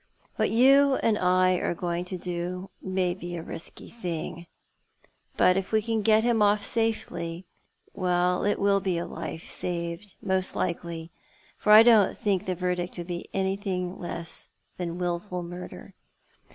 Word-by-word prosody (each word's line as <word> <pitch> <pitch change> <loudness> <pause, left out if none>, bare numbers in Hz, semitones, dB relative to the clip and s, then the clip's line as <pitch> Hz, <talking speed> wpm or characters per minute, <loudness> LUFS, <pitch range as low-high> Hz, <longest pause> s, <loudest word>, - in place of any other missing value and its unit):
"What - - +1
you 275 +3 +5
and 225 -4 +2
I 185 -1 +3
are 175 - -1
going 175 0 -2
to 185 0 -5
do 180 +2 -4
may 185 -1 0
be 175 -1 -6
a 165 - -5
risky 165 - -8
thing; 170 -5 -5 0.9
but 180 +1 +5
if 195 - -3
we 220 - +4
can 220 0 -1
get 220 +1 +4
hira 235 -2 +2
off 205 0 +3
safely 185 -6 -2 0.2
— - - -36
well, 180 -1 +1
it 205 - +1
will 200 0 +3
be 185 -3 -1
a 170 - -2
life 160 - -6
saved, 170 +2 -3
most 190 -1 -1
likely; 170 -1 -3 0.4
for 210 - +1
I 215 +1 +11
don't 225 -4 +5
think 200 -2 0
the 185 - 0
verdict 180 0 -2
would 175 - -5
be 175 -1 -6
anything 190 -1 -2
less 170 -1 -6 0.3
than 175 -1 -4
wilful 180 +1 -3
miirder. 175 +1 -9
180 Hz, 160 wpm, -27 LUFS, 175-205 Hz, 0.9 s, I